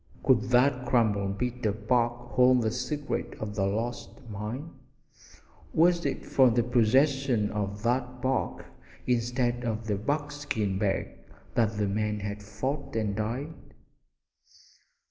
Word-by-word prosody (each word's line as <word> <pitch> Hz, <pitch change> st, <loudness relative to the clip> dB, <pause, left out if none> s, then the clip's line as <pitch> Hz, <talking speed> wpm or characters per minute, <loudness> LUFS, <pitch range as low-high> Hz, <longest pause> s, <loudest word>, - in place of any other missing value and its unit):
Could 130 Hz, -3 st, +4 dB
that 125 Hz, 0 st, +3 dB
crumpled 100 Hz, -5 st, +2 dB
bit 125 Hz, +1 st, -3 dB
of 105 Hz, +1 st, -4 dB
bark 120 Hz, -1 st, +1 dB
hold 125 Hz, -1 st, +5 dB
the 110 Hz, -, +1 dB
secret 145 Hz, +4 st, -3 dB
of 105 Hz, -1 st, -4 dB
the 100 Hz, -1 st, 0 dB
lost 115 Hz, +4 st, -2 dB, 0.2 s
mine? 110 Hz, +10 st, -5 dB, 1.0 s
Was 170 Hz, +1 st, +4 dB
it -, -, -4 dB
for 130 Hz, -2 st, +5 dB
the 120 Hz, 0 st, +2 dB
possession 125 Hz, -1 st, +2 dB
of 105 Hz, 0 st, -3 dB
that 125 Hz, +1 st, 0 dB
bark 130 Hz, +1 st, -1 dB, 0.4 s
instead 120 Hz, 0 st, 0 dB
of 110 Hz, -1 st, -2 dB
the 105 Hz, -3 st, 0 dB
buckskin 145 Hz, -6 st, -2 dB
bag 100 Hz, -2 st, -1 dB, 0.3 s
that 110 Hz, -2 st, +1 dB
the 105 Hz, -1 st, +1 dB
men 105 Hz, +1 st, -1 dB
had 100 Hz, 0 st, -4 dB
fought 130 Hz, +9 st, -4 dB
and 105 Hz, -3 st, 0 dB
died? 120 Hz, +9 st, -3 dB
120 Hz, 130 wpm, -28 LUFS, 105-130 Hz, 1.0 s, hold